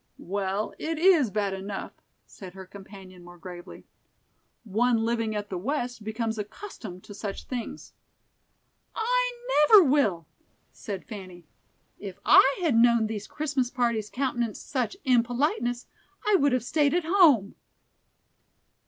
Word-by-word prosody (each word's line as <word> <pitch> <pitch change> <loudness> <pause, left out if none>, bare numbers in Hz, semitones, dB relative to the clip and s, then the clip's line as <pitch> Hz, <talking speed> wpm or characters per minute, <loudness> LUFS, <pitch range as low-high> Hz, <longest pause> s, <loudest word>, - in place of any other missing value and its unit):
"Well, 195 +2 -3
it 325 0 -3
is 330 - +4
bad 200 -1 -1
enough," 195 +1 -6 0.3
said 185 -2 -12
her 190 0 -9
companion, 190 -1 -13
more 175 0 -13
gravely. 175 +1 -11 0.8
"One 225 +2 +1
living 230 -2 -1
at 205 -1 -5
the 185 - -3
west 245 0 -3
becomes 220 +1 -3
accustomed 210 - -8
to 205 - -11
such 200 -1 -6
things." 245 -3 -7 1.0
"I - - +1 0.4
never 420 -4 +9
will," 260 - +1 0.5
said 200 -4 -7
Fanny. 185 -6 -10 0.5
"If 195 -2 -8
I 270 +1 +6
had 310 -8 +2
known 235 -1 +4
these 215 -2 -5
Christmas 280 -5 -2
parties 235 -4 -1
countenanced 240 -4 -3
such 260 +6 -2
impoliteness, 245 0 +1 0.4
I 420 - +2
would 285 -8 +3
have 255 -3 0
stayed 290 +4 +1
at 350 -2 0
home." 315 - +4
230 Hz, 130 wpm, -26 LUFS, 200-275 Hz, 1.0 s, never